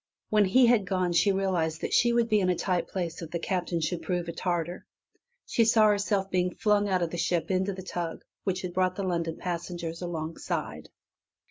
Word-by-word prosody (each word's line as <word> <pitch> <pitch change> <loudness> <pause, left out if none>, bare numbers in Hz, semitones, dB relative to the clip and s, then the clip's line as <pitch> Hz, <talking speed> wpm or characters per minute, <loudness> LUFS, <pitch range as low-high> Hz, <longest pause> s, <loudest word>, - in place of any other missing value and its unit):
When 210 -1 +5
he 245 +7 +5
had 230 -5 +3
gone 185 -3 0
she 200 +4 +4
realized 180 -5 0
that - - -3
she 240 - +4
would 235 -1 +2
be 215 -2 +3
in 185 -2 +1
a 180 - +2
tight 180 0 -1
place 175 -3 -4
if 165 - -6
the 170 - -2
Captain 175 -1 -2
should 165 +2 -1
prove 175 -2 -2
a - - -2
tartar. 175 0 -2 0.6
She 230 - +2
saw 220 -1 +5
herself 200 -1 0
being 180 -1 0
flung 205 -1 +2
out 185 -2 +2
of 165 - -2
the 175 - -4
ship 175 +2 0
into 190 +1 +1
the 185 0 -8
tug 175 -2 -4 0.2
which 190 -1 -2
had 180 -1 -4
brought 185 0 +1
the 200 - -3
London 170 -3 -1
passengers 170 -1 -4
alongside. 165 -2 -4
180 Hz, 210 wpm, -28 LUFS, 170-200 Hz, 0.6 s, When